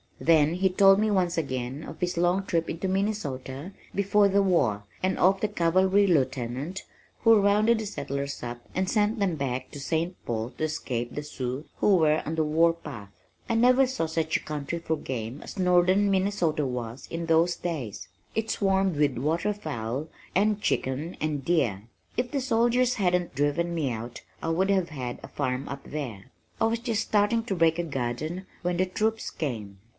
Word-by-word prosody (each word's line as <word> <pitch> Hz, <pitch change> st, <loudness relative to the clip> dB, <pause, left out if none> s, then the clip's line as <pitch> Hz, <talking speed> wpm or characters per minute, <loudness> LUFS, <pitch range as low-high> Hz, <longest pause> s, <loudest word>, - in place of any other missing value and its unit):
Then 160 Hz, 0 st, +4 dB
he 190 Hz, +1 st, +2 dB
told 195 Hz, +1 st, +6 dB
me 215 Hz, 0 st, +2 dB
once 180 Hz, -4 st, +1 dB
again 130 Hz, -1 st, -3 dB
of -, -, -9 dB
his 180 Hz, 0 st, -1 dB
long 175 Hz, +3 st, +2 dB
trip 165 Hz, -3 st, 0 dB
into 170 Hz, +4 st, -3 dB
Minnesota 180 Hz, -7 st, -2 dB, 0.2 s
before 200 Hz, +1 st, +3 dB
the 200 Hz, +1 st, +3 dB
war, 125 Hz, -, +2 dB, 0.2 s
and 185 Hz, 0 st, 0 dB
of 190 Hz, +1 st, +3 dB
the 215 Hz, -, +2 dB
cavalry 190 Hz, +1 st, +3 dB
lieutenant 140 Hz, 0 st, 0 dB, 0.4 s
who 225 Hz, -2 st, +6 dB
rounded 210 Hz, +3 st, +4 dB
the 220 Hz, -, -3 dB
settlers 140 Hz, -7 st, -4 dB
up 120 Hz, 0 st, -5 dB, 0.2 s
and 185 Hz, 0 st, 0 dB
sent 215 Hz, +1 st, +1 dB
them 190 Hz, -4 st, +1 dB
back 130 Hz, -3 st, -3 dB
to 145 Hz, -, -8 dB
St. 165 Hz, +5 st, -1 dB
Paul 115 Hz, +1 st, -2 dB
to -, -, -3 dB
escape 125 Hz, -6 st, -2 dB
the 150 Hz, -, -4 dB
Sioux 130 Hz, 0 st, -4 dB
who 200 Hz, -2 st, +4 dB
were 155 Hz, -2 st, +3 dB
on 160 Hz, -, -2 dB
the 160 Hz, -, +2 dB
warpath. 155 Hz, -8 st, 0 dB, 0.4 s
"I 230 Hz, -, +1 dB
never 250 Hz, +3 st, +5 dB
saw 255 Hz, -10 st, -1 dB
such 160 Hz, 0 st, 0 dB
a -, -, -11 dB
country 150 Hz, +2 st, -4 dB
for 160 Hz, -1 st, -1 dB
game 130 Hz, -2 st, -5 dB
as -, -, -9 dB
Northern 185 Hz, +2 st, +4 dB
Minnesota 185 Hz, -6 st, +1 dB
was 125 Hz, -1 st, -5 dB
in 165 Hz, 0 st, -3 dB
those 165 Hz, +2 st, +3 dB
days. 145 Hz, -, -5 dB, 0.3 s
It 225 Hz, 0 st, -1 dB
swarmed 195 Hz, -4 st, +1 dB
with 145 Hz, -4 st, +2 dB
water 160 Hz, -, 0 dB
fowl 140 Hz, -, -4 dB, 0.3 s
and 210 Hz, +2 st, +2 dB
chicken 145 Hz, +4 st, -1 dB
and 150 Hz, -3 st, -2 dB
deer. 120 Hz, -, +1 dB, 0.3 s
If 245 Hz, +1 st, 0 dB
the 280 Hz, -, 0 dB
soldiers 245 Hz, 0 st, +2 dB
hadn't 180 Hz, -3 st, 0 dB
driven 145 Hz, +5 st, 0 dB
me 150 Hz, -6 st, 0 dB
out 115 Hz, +1 st, -6 dB, 0.2 s
I 165 Hz, -, -2 dB
would 185 Hz, +4 st, +1 dB
have 190 Hz, -3 st, +2 dB
had 130 Hz, -5 st, -5 dB
a -, -, -7 dB
farm 130 Hz, +2 st, -2 dB
up 140 Hz, 0 st, -6 dB
there. 130 Hz, -6 st, -6 dB, 0.3 s
I -, -, +3 dB
was 225 Hz, +1 st, +1 dB
just 230 Hz, -3 st, -1 dB
starting 215 Hz, +2 st, +2 dB
to 200 Hz, -, -1 dB
break 165 Hz, -1 st, +3 dB
a -, -, +1 dB
garden 150 Hz, +5 st, -3 dB, 0.2 s
when 175 Hz, -1 st, -1 dB
the 185 Hz, -, +3 dB
troops 220 Hz, +4 st, -1 dB
came." 110 Hz, -10 st, -4 dB
165 Hz, 185 wpm, -27 LUFS, 140-195 Hz, 0.4 s, told